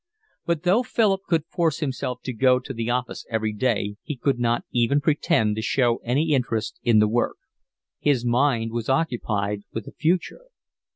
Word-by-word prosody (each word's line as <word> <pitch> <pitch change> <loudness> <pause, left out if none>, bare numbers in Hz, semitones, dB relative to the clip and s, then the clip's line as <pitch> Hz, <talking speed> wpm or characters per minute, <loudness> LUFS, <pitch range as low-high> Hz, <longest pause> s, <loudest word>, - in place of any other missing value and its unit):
But 170 -2 0
though 185 +6 +4
Philip 210 -5 +1
could 165 -3 +1
force 165 -2 0
himself 130 -4 -3
to 130 - -4
go 125 +2 +4
to 135 +1 -6
the 115 -1 -3
office 125 0 -2
every 110 -2 -1
day 105 -2 -1
he 150 - -6
could 130 0 0
not 120 0 0
even 125 +4 +2
pretend 140 -8 +1
to - - -1
show 120 0 +2
any 145 +7 0
interest 120 -5 -1
in 120 -3 +3
the 105 0 +5
work. 120 +3 0 0.6
His 135 -5 +1
mind 120 -2 +2
was 115 0 -3
occupied 110 -8 0
with 110 -2 -5
the - - -9
future. 175 - -1
125 Hz, 175 wpm, -24 LUFS, 115-150 Hz, 0.6 s, the